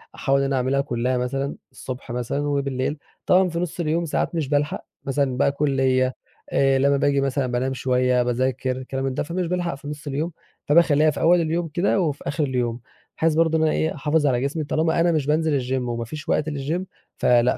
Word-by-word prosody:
أحاول 135 0 +1
إن 140 - +1
أنا 135 0 0
أعملها 130 +2 +1
كلّها 125 -2 -1
مثلًا، 135 +3 -2 0.2
الصبح 130 -1 -7
مثلًا 125 +3 -2
وبالليل. 140 0 -1 0.3
طبعًا 185 0 +4
في 170 0 -3
نُص 175 0 -4
اليوم 170 +1 0
ساعات 165 - -1
مش 155 -5 -1
بالحق 145 0 0 0.2
مثلًا 135 -2 0
بقى 140 - +3
كُلية، 130 -3 +1 0.3
آآ 135 -1 +3
لمّا 140 +1 +3
باجي 140 0 +2
مثلًا 135 -1 0
بانام 125 +2 -1
شوية، 125 -1 +2
باذاكر، 130 +1 -1
كلام 135 0 -3
ده، - - -1
فمش 170 +3 -2
بالحق 175 -2 -1
في 140 +1 -11
نص 150 0 -7
اليوم 150 +5 -2 0.3
فباخلّيها 155 -1 +4
في - - -6
أول 175 +1 +4
اليوم 165 +1 -1
كده 175 +5 +1
وفي 150 -5 -1
آخر 145 +2 0
اليوم 125 -4 -1 0.4
بحيث 160 0 +2
برضه 160 0 +3
إن 160 - +1
أنا 155 - +3
إيه 160 - 0
أحافظ 150 +1 +1
على 125 -3 +2
جسمي 140 +4 -1
طالما 160 +3 +1
أنا 170 +1 +4
مش 155 -4 0
بانزل 155 -1 +2
الgym 125 +1 -3 0.2
وما 115 0 -3
فيش 150 +5 -8
وقت 150 - +1
للgym 150 +4 -2 0.4
فلأ 120 0 +3
140 Hz, 200 wpm, -23 LUFS, 130-155 Hz, 0.4 s, طبعًا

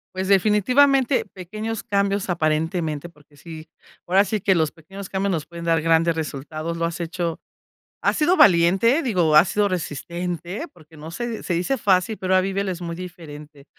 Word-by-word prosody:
Pues, 190 0 -2
definitivamente, 250 +7 +3
pequeños 215 +4 -6
cambios 200 -1 -1
aparentemente, 160 -1 -1
porque 150 -2 -24
sí, 160 +1 -11 0.4
ahora 190 +3 +4
sí 210 0 -3
que 195 - +3
los 160 -4 +1
pequeños 195 +4 -11
cambios 195 0 -1
nos 155 -4 -3
pueden 170 0 -9
dar 165 -1 +2
grandes 165 +1 +2
resultados, 155 +2 -5
lo 165 - -1
has 170 +1 -4
hecho 170 0 -3 0.6
has - - +1
sido 345 +5 +3
valiente, 195 - +4
digo, 180 - +1
has 160 +4 +7
sido 205 +1 +1
resistente 175 - -4
porque 160 -2 -18
no, 155 +2 -9
se 235 +4 -5
se 180 - -2
dice 180 +11 -1
fácil, 195 +1 +1
pero 185 0 0
ahora 185 - +4
vívelo, 195 0 -2
es 180 -1 -6
muy 170 -1 -4
diferente. 155 -5 -10
175 Hz, 175 wpm, -22 LUFS, 165-200 Hz, 0.6 s, has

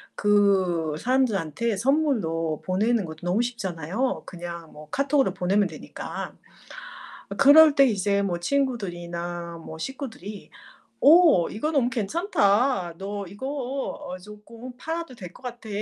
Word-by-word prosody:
그 190 -6 +2
사람들한테 230 - 0
선물로 200 - 0
보내는 210 +3 +1
것도 160 -1 -8
너무 195 +6 +2
쉽잖아요. 200 - -3
그냥 170 -2 -8
뭐 150 0 -13
카톡으로 275 - +1
보내면 195 +2 +2
되니까. 155 -3 -7 0.9
아 - - -5
그럴 295 +1 +8
때 275 - +7
이제 200 -3 +1
뭐 180 -3 -1
친구들이나 175 -8 -3
뭐 160 - -8
식구들이 225 - -7 0.5
"오. 310 - +6
이거 300 +9 -2
너무 270 -6 +2
괜찮다. 220 - +1
너 200 +1 -5
이거 205 +8 -8
어 270 -9 -4
조끔 225 +5 -12
팔아도 325 0 -5
될 180 -6 -10
것 - - -17
같아." 240 -2 -7
205 Hz, 270 characters per minute, -25 LUFS, 175-260 Hz, 0.9 s, 그럴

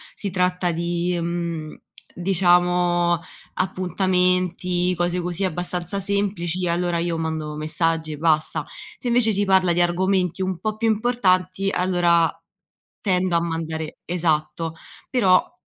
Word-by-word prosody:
si 200 -3 -4
tratta 180 -1 +1
di, 170 +1 -1
mhmm, 170 -2 -3 0.4
diciamo, 175 -1 +2 0.4
appuntamenti, 180 -1 +1
cose 175 +1 0
così, 180 +2 -2
abbastanza 180 +2 -2
semplici, 185 -3 -1
allora 175 0 0
io 170 0 -1
mando 160 -2 -3
messaggi 155 +1 -1
e - - -7
basta, 155 -1 +1 0.3
se 245 - -6
invece 235 -2 +4
si 205 0 0
parla 190 -2 +4
di 175 - +2
argomenti 185 +1 +1
un 185 -2 -1
po’ 215 +2 -2
più 225 +1 -1
importanti 195 -4 +1
allora 175 -3 +2 0.7
tendo 185 -3 +1
a 170 - +3
mandare 160 -1 -4
esatto, 165 -1 -1 0.3
però 190 -8 +3
175 Hz, 120 wpm, -22 LUFS, 170-185 Hz, 0.7 s, invece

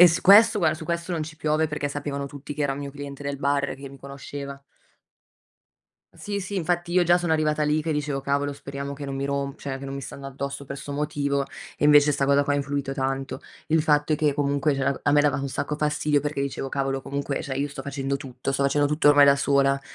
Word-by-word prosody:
E - - +12
s 170 -1 +2
questo 215 +3 +7
guarda, 155 -3 +3
su 160 - -8
questo 170 +2 -3
non 165 -2 -1
ci 155 +1 -10
piove 155 0 +1
perché 150 -1 -3
sapevano 140 -1 -4
tutti 145 +1 -8
che 150 - -2
era 140 -1 +1
un 135 - -6
mio 140 -1 -5
cliente 145 0 -8
del 140 0 -2
bar 140 0 0
che 135 +1 -9
mi 135 0 -13
conosceva. 140 0 -8 1.5
Sì, 205 -1 -4
sì, 195 +1 -5
infatti 175 0 -1
io 180 0 +4
già 175 +1 +5
sono 175 -2 0
arrivata 155 -1 +1
lì 150 +1 +2
che 160 +1 -3
dicevo 150 -2 -1
cavolo 140 +1 0
speriamo 140 0 -6
che 140 0 -7
non 135 - -4
mi 135 - -2
rom 140 0 -2
cioè, 135 -1 -5
che 135 - -7
non 135 - -5
mi 140 - -5
stanno 135 +1 -8
addosso 140 +1 -5
per 140 - -6
'sto 145 - -7
motivo 140 -1 -1 0.3
e 145 - +3
invece 150 0 +6
'sta 140 -1 0
cosa 140 +1 +4
qua 145 - 0
ha - - +2
influito 140 -1 -2
tanto. 135 0 -3 0.3
Il 160 +1 +3
fatto 150 0 +2
è - - +3
che 150 -2 +1
comunque 145 0 +1
cioè, 135 0 -1
a - - +2
me 145 - +6
dava 145 -1 +2
un 140 0 -3
sacco 145 +2 -3
fastidio 150 -1 +1
perché 145 0 -2
dicevo: 135 -1 -3
"Cavolo, 135 0 -1
comunque 140 0 -3
cioè, 135 - -4
io 140 +2 0
sto 140 -1 -8
facendo 140 0 -2
tutto, 130 0 -5
sto 135 - 0
facendo 145 +1 +3
tutto 150 0 +3
ormai 145 -1 +8
da 140 0 +6
sola. 140 0 +2
140 Hz, 245 wpm, -25 LUFS, 140-150 Hz, 1.5 s, E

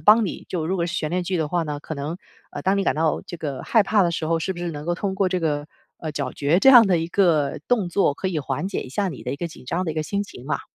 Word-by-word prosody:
帮 215 +1 +6
你 185 - -5
就 165 -4 -2
如 190 - 0
果 170 -1 0
是 175 - -4
悬 155 -1 -1
念 180 +1 0
剧 185 0 -1
的 155 -2 -1
话 170 0 0
呢， 145 -1 -4
可 160 - -6
能， 150 +5 -4 0.4
呃， - - -6
当 195 +1 +2
你 195 - +1
感 - - +2
到 160 0 +1
这 175 - -6
个 145 -5 -4
害 225 - +4
怕 205 0 +3
的 170 - +2
时 160 - -2
候， 165 +1 +1
是 175 +4 -2
不 175 - -10
是 175 -1 -2
能 150 -1 -7
够 175 - +1
通 190 +2 -2
过 190 -2 +2
这 180 -1 -1
个， 145 -2 -1 0.3
呃， 155 -2 -5
咀嚼 145 +4 0
这 270 - +8
样 240 -5 +9
的 180 -3 +3
一 165 +1 -2
个 165 -8 +2
动 220 -7 +1
作， 175 -5 +2
可 190 0 -2
以 170 - -1
缓 140 +6 -2
解 - - -3
一 - - -10
下 195 +9 -1
你 140 - -8
的 125 - -2
一 140 - -4
个 170 +2 -4
紧 150 - -13
张 180 +8 -1
的 160 - -2
一 - - -5
个 155 - 0
心 200 +3 -1
情 135 -10 -11
嘛。 150 -2 -1
170 Hz, 350 characters per minute, -23 LUFS, 150-190 Hz, 0.4 s, 样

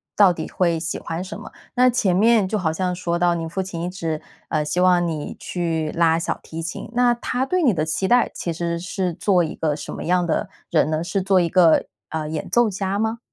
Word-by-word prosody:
到 195 -3 +6
底 - - -6
会 170 -3 +1
喜 165 - -3
欢 165 +2 -4
什 190 - -7
么。 - - -10 0.2
那 250 0 +5
前 210 -7 +1
面 215 0 +4
就 215 - -1
好 165 -4 0
像 180 +2 -1
说 170 -1 -2
到 175 0 +3
你 165 -1 -3
父 190 +4 -3
亲 180 -3 -6
一 175 - -2
直， 165 -4 -3 0.3
呃， 155 - 0
希 175 +4 -1
望 180 -1 +4
你 155 -3 -4
去 165 -3 -2
拉 165 -1 +3
小 170 - -2
提 165 0 -7
琴， 165 +4 -6
那 245 0 +4
他 250 +2 -2
对 365 +5 0
你 250 -7 +4
的 155 -3 0
期 160 +5 -1
待 245 +2 +4
其 170 - -3
实 170 +1 -2
是 180 +1 -2
做 180 0 +2
一 160 - -4
个 155 -2 0
什 - - -7
么 - - -6
样 180 0 +2
的 170 - -1 0.2
人 155 -2 +2
呢？ 155 +1 0
是 195 +3 -1
做 190 0 +3
一 175 - +2
个， 170 -2 +4 0.2
呃， 155 -1 -3
演 155 0 -4
奏 240 -2 +3
家 195 0 -2
吗？ 225 +1 -1
175 Hz, 255 characters per minute, -22 LUFS, 165-195 Hz, 0.3 s, 到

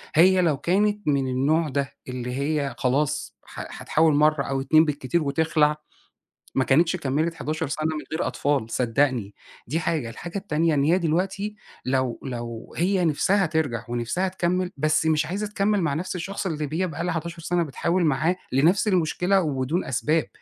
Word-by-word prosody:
هي 185 +3 +6
لو 160 -5 +2
كانت 205 +7 0
من 140 -2 +2
النوع 145 +5 +1
ده، 140 0 -2
اللي 125 -1 -4
هي 145 0 -1
خلاص 135 - 0
ح - - -8
هتحاول 160 0 +3
مرّة 150 -1 +3
أو 135 -1 -2
اتنين 155 +4 +5
بالكتير 150 +2 -1
وتخلع، 150 +1 +2 0.8
ما 130 - +3
كانتش 165 +7 +3
كملت 155 +1 -1
11 155 0 -3
سنة 155 +2 -3
من 150 - -5
غير 160 - -1
أطفال 140 -6 0
صدقني 120 -3 0 0.3
دي 155 +7 -1
حاجة، 155 -7 -1
الحاجة 170 - -7
التانية 165 -4 0
إن 140 -2 +2
هي 165 +5 +4
دلوقتي 190 +5 -1 0.3
لو 130 -2 0
لو 120 -3 -6
هي 180 +1 +2
نِفسها 190 +6 +2
ترجَع 155 -8 -1
ونِفسها 120 +10 -1
تكمّل 180 0 -1
بس 155 +2 +2
مش 155 -1 +2
عايزة 200 +6 -3
تكمّل 205 0 +1
مع 155 -4 0
نَفْس 180 +6 -3
الشخص 195 +3 -4
اللي 155 -5 -2
هي 185 - +1
بقى 160 0 -5
لها 180 0 -1
11 170 +1 -5
سنة 175 +1 0
بتحاول 170 +4 0
معاه 155 +4 +2 0.2
لنَفْس 165 - +3
المشكلة 185 +1 +2
وبدون 145 +2 -1
أسباب. 150 +5 0
155 Hz, 170 wpm, -24 LUFS, 140-175 Hz, 0.8 s, هي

